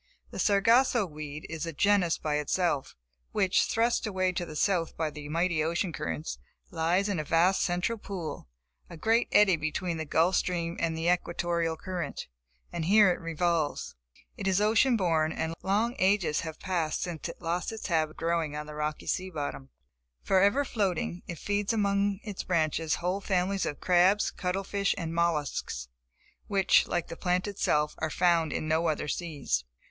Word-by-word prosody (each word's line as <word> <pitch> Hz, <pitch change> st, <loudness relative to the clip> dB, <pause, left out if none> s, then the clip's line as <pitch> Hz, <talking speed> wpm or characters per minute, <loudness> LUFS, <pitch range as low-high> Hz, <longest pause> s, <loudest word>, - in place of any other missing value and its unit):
The -, -, -7 dB
Sargasso 230 Hz, +3 st, +4 dB
weed 150 Hz, -2 st, -7 dB
is 160 Hz, 0 st, -4 dB
a -, -, -3 dB
genus 190 Hz, +1 st, +3 dB
by 150 Hz, -1 st, -1 dB
itself, 150 Hz, -2 st, -1 dB, 0.4 s
which, 190 Hz, -2 st, +3 dB
thrust 230 Hz, 0 st, +1 dB
away 185 Hz, -2 st, 0 dB
to 175 Hz, -1 st, -3 dB
the 155 Hz, -, -8 dB
south 170 Hz, -1 st, 0 dB
by 160 Hz, -2 st, -1 dB
the 145 Hz, 0 st, -8 dB
mighty 165 Hz, 0 st, +1 dB
ocean 170 Hz, +2 st, -1 dB
currents, 75 Hz, -, -4 dB, 0.3 s
lies 175 Hz, +5 st, +1 dB
in 200 Hz, -5 st, -1 dB
a -, -, -1 dB
vast 170 Hz, +5 st, +3 dB
central 180 Hz, +6 st, 0 dB
pool, 170 Hz, -, -6 dB, 0.4 s
a 170 Hz, -, -9 dB
great 225 Hz, +7 st, +2 dB
eddy 205 Hz, -4 st, +5 dB
between 165 Hz, +3 st, -2 dB
the 160 Hz, -, -3 dB
Gulf 165 Hz, +5 st, +2 dB
Stream 170 Hz, -2 st, -1 dB
and 165 Hz, -1 st, -1 dB
the 165 Hz, +1 st, -1 dB
Equatorial 170 Hz, -2 st, 0 dB
current; 180 Hz, 0 st, -5 dB, 0.5 s
and 160 Hz, -, -2 dB
here 205 Hz, +1 st, +6 dB
it -, -, -3 dB
revolves. 165 Hz, -1 st, -1 dB, 0.4 s
It 195 Hz, -, -3 dB
is 190 Hz, 0 st, +3 dB
ocean 225 Hz, +4 st, +4 dB
born, 160 Hz, -5 st, +1 dB
and 160 Hz, 0 st, -2 dB
long 215 Hz, +5 st, +1 dB
ages 185 Hz, -5 st, +2 dB
have 160 Hz, -1 st, -6 dB
passed 170 Hz, -4 st, -1 dB
since 175 Hz, -3 st, -5 dB
it -, -, -9 dB
lost 175 Hz, +5 st, -2 dB
its 220 Hz, -1 st, -7 dB
habit 160 Hz, -4 st, +1 dB
of -, -, -26 dB
growing 165 Hz, -3 st, -1 dB
on 150 Hz, 0 st, -4 dB
the 150 Hz, -, -9 dB
rocky 150 Hz, 0 st, -3 dB
sea 185 Hz, 0 st, -1 dB
bottom. 145 Hz, -4 st, -5 dB, 0.5 s
Forever 200 Hz, +9 st, +3 dB
floating 185 Hz, -6 st, -1 dB
it 170 Hz, -, -5 dB
feeds 205 Hz, +4 st, -1 dB
among 200 Hz, -1 st, +1 dB
its 210 Hz, -3 st, -5 dB
branches 160 Hz, -2 st, 0 dB
whole 180 Hz, +3 st, -2 dB
families 190 Hz, 0 st, 0 dB
of 145 Hz, -, -4 dB
crabs, 185 Hz, +3 st, +3 dB
cuttle 185 Hz, +1 st, -2 dB
fish 200 Hz, 0 st, 0 dB
and 165 Hz, -3 st, -4 dB
mollusks, 150 Hz, -, -1 dB, 0.6 s
which 195 Hz, -2 st, +3 dB
like 175 Hz, -2 st, -1 dB
the -, -, -6 dB
plant 180 Hz, +2 st, 0 dB
itself, 150 Hz, -7 st, 0 dB
are 160 Hz, -, -1 dB
found 170 Hz, -2 st, +2 dB
in 155 Hz, -, -3 dB
no 160 Hz, +2 st, +2 dB
other 155 Hz, -1 st, -1 dB
seas. 145 Hz, -, -2 dB
175 Hz, 175 wpm, -29 LUFS, 160-195 Hz, 0.6 s, here